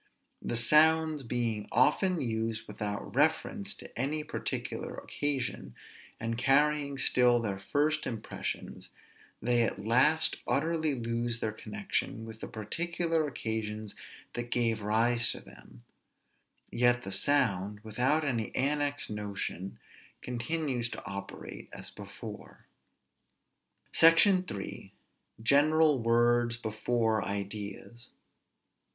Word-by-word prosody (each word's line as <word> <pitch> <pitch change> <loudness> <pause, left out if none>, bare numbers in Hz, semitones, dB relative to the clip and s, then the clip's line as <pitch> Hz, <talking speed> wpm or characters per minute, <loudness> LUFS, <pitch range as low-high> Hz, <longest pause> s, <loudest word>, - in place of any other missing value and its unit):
The 120 - -2
sounds 155 +4 +5
being 115 -4 -2
often 165 +8 +3
used 110 -3 -2
without 105 +2 -5
reference 195 - +1
to - - -12
any 150 +4 -1
particular - - -4
occasion, 135 - -2 0.4
and 115 +1 -3
carrying 140 +1 +2
still 125 -2 +4
their 100 -4 -3
first 150 +9 0
impressions, 115 -3 -5 0.5
they 120 0 +3
at 100 -3 -1
last 150 +8 +4
utterly 155 0 +1
lose 115 0 -2
their 110 - -1
connection 190 - -4
with 110 -1 -10
the - - -6
particular 165 +7 -1
occasions 110 -5 -4 0.4
that 120 0 -4
gave 115 -3 +1
rise 115 +3 +3
to - - -8
them; - - -16 0.9
yet 120 0 +3
the 95 - -6
sound, 105 -4 +1
without 125 +8 +1
any 120 -7 -1
annexed 145 -1 0
notion, 100 -2 -5 0.5
continues 125 0 -1
to - - -8
operate 100 0 -8
as - - -7
before. - - -10 1.3
SECTION 180 +3 +6
III. 100 -1 -7 0.5
GENERAL 150 +2 +4
WORDS 120 +1 +3
BEFORE 110 -1 0
IDEAS. 100 +3 -6
120 Hz, 105 wpm, -30 LUFS, 110-150 Hz, 1.3 s, SECTION